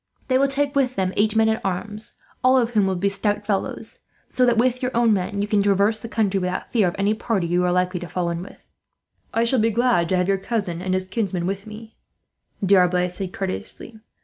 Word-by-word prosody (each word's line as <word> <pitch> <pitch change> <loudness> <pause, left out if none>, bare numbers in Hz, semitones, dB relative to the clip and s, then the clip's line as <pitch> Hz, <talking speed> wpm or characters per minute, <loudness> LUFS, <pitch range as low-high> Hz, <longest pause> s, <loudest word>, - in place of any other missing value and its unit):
They 260 0 +3
will 275 - +4
take 280 +1 -1
with 260 -2 +1
them 185 -1 -1
eight 215 +1 +2
men 220 0 +4
at 220 0 0
arms, 210 +3 -4 0.3
all 255 +1 +5
of 240 -2 +1
whom 210 -4 +2
will 190 - 0
be 190 +3 0
stout 205 +1 -1
fellows; 200 -2 -3 0.3
so 250 -1 +2
that, 235 -1 +3
with 250 +1 +2
your 250 - 0
own 235 -2 +4
men, 200 +1 -1
you - - -2
can 210 -1 +2
traverse 200 +2 +2
the 230 - -8
country 205 -4 +1
without 180 0 -3
fear 215 -6 +3
of 175 - -2
any 200 +2 +2
party 215 -4 -1
you 175 +1 +1
are 180 - +2
likely 180 0 0
to 175 - -7
fall 175 -2 -1
in 170 0 -4
with." 185 - -13 0.6
"I 230 - +1
shall 235 +2 +2
be 225 +1 +3
glad 230 -7 +2
to 185 - +2
have 180 0 +1
your 195 -1 +1
cousin 195 -5 -3
and 185 0 -1
his 185 0 -2
kinsman 190 -4 -2
with 195 +2 -4
me," 220 +1 -11 0.7
D'Arblay 180 -2 +3
said 180 0 -4
courteously. 215 +2 -6
205 Hz, 230 wpm, -22 LUFS, 185-225 Hz, 0.7 s, all